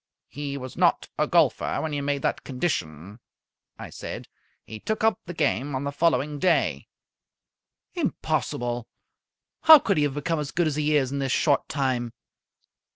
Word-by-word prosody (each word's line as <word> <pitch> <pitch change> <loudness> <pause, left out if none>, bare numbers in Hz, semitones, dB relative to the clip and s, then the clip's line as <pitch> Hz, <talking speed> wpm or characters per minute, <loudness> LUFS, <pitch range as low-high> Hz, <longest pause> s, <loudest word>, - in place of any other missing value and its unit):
"He 140 +1 -5
was 130 -1 -8
not - - +2
a - - +2
golfer - - +2
when 155 -1 -3
you 145 - -1
made 140 -1 -2
that - - -1
condition," 105 - -3 0.6
I - - -9
said. - - -7 0.4
"He 110 - -9
took 220 - -3
up 220 0 +3
the 175 - -5
game 145 -2 0
on 130 - -2
the 140 - -2
following 150 -1 +1
day." 140 - +1 1.1
"Impossible! 120 -1 -2 0.7
How 320 0 +10
could 200 - 0
he 150 - +3
have 140 -1 -3
become 155 +2 -1
as 145 -2 -3
good 175 +2 0
as 155 -3 0
he 150 0 +1
is 135 -3 +2
in 140 - -2
this 135 -1 -1
short 145 0 +2
time?" 130 -4 -1
140 Hz, 165 wpm, -25 LUFS, 130-155 Hz, 1.1 s, How